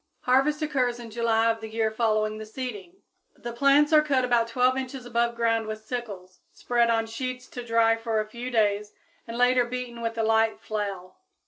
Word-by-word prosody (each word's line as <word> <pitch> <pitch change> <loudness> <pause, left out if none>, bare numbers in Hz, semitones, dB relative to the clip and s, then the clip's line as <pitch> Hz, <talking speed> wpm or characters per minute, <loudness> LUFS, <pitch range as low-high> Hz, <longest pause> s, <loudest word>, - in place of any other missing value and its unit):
Harvest 275 +5 +2
occurs 255 -5 0
in 230 -2 -9
July 230 0 +2
of 225 0 -6
the 220 - -7
year 220 0 0
following 215 -1 0
the 215 - -7
seeding. 255 - -7 0.3
The 240 0 -7
plants 280 +5 +4
are 305 - +8
cut 275 -4 +1
about 240 -2 +2
12 250 +2 +2
inches 265 -1 -5
above 235 0 0
ground 230 -1 +1
with 215 0 -6
sickles, 200 -7 -6
spread 240 -1 +1
on 225 -1 +2
sheets 250 +2 -5
to 245 - -7
dry 230 -1 +3
for 225 -1 -1
a 215 - -1
few 235 +3 -6
days, 210 -3 +1 0.3
and 230 0 -6
later 245 0 +4
beaten 240 -1 -6
with 230 0 -3
a 225 - +1
light 225 0 +2
flail. 200 -4 -5
235 Hz, 195 wpm, -26 LUFS, 220-250 Hz, 0.3 s, are